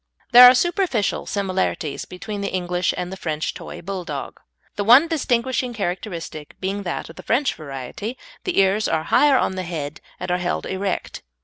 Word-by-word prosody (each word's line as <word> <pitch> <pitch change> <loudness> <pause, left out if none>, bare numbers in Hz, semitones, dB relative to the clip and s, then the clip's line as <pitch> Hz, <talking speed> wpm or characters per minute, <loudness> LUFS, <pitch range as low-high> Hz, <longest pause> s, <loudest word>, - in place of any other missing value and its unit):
There 250 0 +11
are 255 - +5
superficial 345 - 0
similarities 190 -6 -2
between 200 +3 -6
the 200 - -2
English 180 -1 0
and 180 0 -3
the - - -7
French 155 -3 -2
toy - - -9
Bulldog, 190 -1 -5 0.4
the 205 - -1
one 245 +10 +7
distinguishing 255 -5 0
characteristic 175 -6 -5
being 195 +2 -2
that 175 -3 -4
in - - -17
the - - -9
French 265 +5 +1
variety 155 - -6 0.3
the 365 - -2
ears 195 +2 +3
are 160 -1 0
higher 290 -2 +6
on - - +1
the 190 0 -4
head 160 -4 -5 0.2
and 180 - -3
are 180 - +1
held 175 0 -2
erect. 190 0 -3
195 Hz, 175 wpm, -22 LUFS, 175-240 Hz, 0.4 s, There